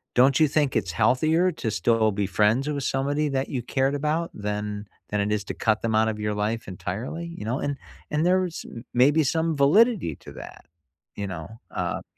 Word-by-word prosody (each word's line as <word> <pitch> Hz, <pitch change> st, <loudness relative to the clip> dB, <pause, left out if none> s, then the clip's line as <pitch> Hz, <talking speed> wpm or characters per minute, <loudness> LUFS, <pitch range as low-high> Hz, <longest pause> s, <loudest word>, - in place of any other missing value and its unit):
don't 130 Hz, +2 st, +5 dB
you 155 Hz, -, +6 dB
think 145 Hz, -1 st, +1 dB
it's 90 Hz, -2 st, 0 dB
healthier 160 Hz, -, +3 dB
to 115 Hz, -9 st, -3 dB
still 110 Hz, +2 st, +2 dB
be 100 Hz, 0 st, -1 dB
friends 105 Hz, +8 st, +2 dB
with 140 Hz, -2 st, -2 dB
somebody 145 Hz, +3 st, 0 dB
that 135 Hz, 0 st, -1 dB
you 125 Hz, -3 st, -2 dB
cared 135 Hz, +3 st, 0 dB
about 155 Hz, +3 st, -1 dB
than 105 Hz, 0 st, -3 dB, 0.2 s
than 105 Hz, -, -1 dB
it 105 Hz, +1 st, -1 dB
is 105 Hz, -1 st, -1 dB
to -, -, -4 dB
cut 110 Hz, -1 st, +1 dB
them 110 Hz, -1 st, 0 dB
out 110 Hz, 0 st, +4 dB
of 105 Hz, -1 st, -2 dB
your 105 Hz, 0 st, -1 dB
life 110 Hz, +1 st, -2 dB
entirely, 120 Hz, -, -5 dB
you -, -, -6 dB
know," 120 Hz, +5 st, -1 dB
and 145 Hz, -1 st, -2 dB, 0.3 s
and 150 Hz, +2 st, +1 dB
there 185 Hz, +1 st, +4 dB
was 175 Hz, -3 st, -4 dB, 0.3 s
maybe 145 Hz, +6 st, +4 dB
some 160 Hz, +2 st, 0 dB
validity 175 Hz, -, +4 dB
to -, -, -12 dB
that, -, -, -11 dB, 0.5 s
you 100 Hz, -, -3 dB
know, 85 Hz, -4 st, -6 dB, 0.2 s
uh -, -, -3 dB
130 Hz, 200 wpm, -25 LUFS, 105-150 Hz, 0.5 s, you